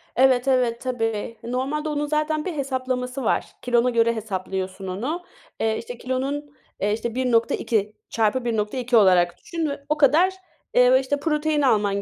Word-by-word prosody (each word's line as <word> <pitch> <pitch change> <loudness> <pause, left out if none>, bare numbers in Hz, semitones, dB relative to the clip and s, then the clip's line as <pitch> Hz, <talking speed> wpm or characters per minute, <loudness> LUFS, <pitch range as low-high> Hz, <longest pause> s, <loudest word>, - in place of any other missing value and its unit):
Evet, 255 0 +4
evet, 250 -3 +2
tabii. 225 -3 -2
Normalde 270 +6 -2
onun 295 0 -1
zaten 305 +1 -1
bir 365 - -2
hesaplaması 260 -2 -3
var. - - +1 0.2
Kilona 245 0 +2
göre 230 -1 +2
hesaplıyorsun 190 -2 -4
onu. 255 - -3 0.4
Eee, 220 0 +1
işte 245 +1 -7
kilonun, 275 +4 -3 0.3
eee, 205 +2 +1
işte 230 +1 -3
1.2 230 -4 +1
çarpı 230 +3 0
1.2 235 +2 0
olarak 180 -4 +4
düşün 330 - -3
ve 280 0 -6
o 300 - +1
kadar, 310 +6 +4 0.4
eee, 250 +1 +6
işte 285 +2 -2
protein 300 0 0
alman 205 -6 +2
250 Hz, 150 wpm, -23 LUFS, 220-285 Hz, 0.4 s, eee